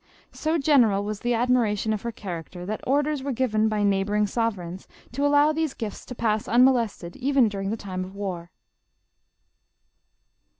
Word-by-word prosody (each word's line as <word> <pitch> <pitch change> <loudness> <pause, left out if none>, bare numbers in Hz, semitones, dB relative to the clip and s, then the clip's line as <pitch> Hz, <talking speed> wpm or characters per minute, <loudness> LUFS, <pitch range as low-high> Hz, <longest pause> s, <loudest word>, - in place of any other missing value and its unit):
So 320 +1 -1
gen 285 -2 +5
eral 200 -3 +2
was 210 0 -4
the 240 +1 0
admiration 225 -3 +1
of 210 - -3
her 235 - -3
character, 180 -3 -7
that 215 +3 -4
orders 290 +1 +1
were 275 +1 -3
given 220 -4 +1
by 210 -1 0
neighboring 205 +1 +2
sovereigns 195 -5 -3 0.2
to 275 +4 -2
allow 290 +1 +4
these 315 -2 -2
gills 215 -3 -6
to 250 - -7
pass 215 -2 0
unmolested 235 -7 +2
even 270 -2 +3
during 195 -2 -3
the 220 - -2
time 185 -3 -5
of 190 +1 -10
war. 180 -4 -5
220 Hz, 165 wpm, -25 LUFS, 200-255 Hz, 0.2 s, gen